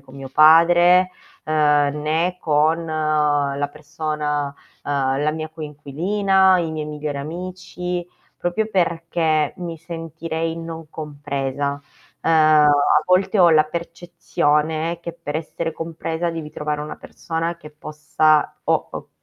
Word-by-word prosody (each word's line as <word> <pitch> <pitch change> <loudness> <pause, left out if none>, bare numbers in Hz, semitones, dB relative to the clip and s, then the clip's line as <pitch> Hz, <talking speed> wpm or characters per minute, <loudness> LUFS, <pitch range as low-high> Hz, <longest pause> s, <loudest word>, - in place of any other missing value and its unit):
con 135 -1 -17
mio 135 -1 -8
padre, 175 +4 +6 0.3
uhm, 155 - -2 0.5
né 165 +4 0
con 160 +2 +2
la 150 -2 0
persona 150 -1 -3 0.4
uhm, 135 -1 0
la 150 - +2
mia 155 0 -5
coinquilina, 180 +6 +1
i 165 -2 -1
miei 155 -1 -4
migliori 150 -1 -4
amici, 180 +2 -5 0.3
proprio 175 +5 -1
perché 165 -4 0
mi 170 -2 -5
sentirei 165 0 -5
non 165 -1 -7
compresa. 140 -2 -4 0.4
Uhm, - - +1
a 150 -2 +5
volte 190 +3 +2
ho 175 -2 +7
la 155 -1 +5
percezione 165 -1 -1
che 170 0 -5
per 165 -3 -5
essere 165 +1 -4
compresa 165 +1 -3
devi 160 -2 -6
trovare 150 0 -3
una 150 - -6
persona 165 +1 -4
che 150 -2 -11
possa 150 0 +1
o - - +1
o - - -8
155 Hz, 125 wpm, -21 LUFS, 150-170 Hz, 0.5 s, ho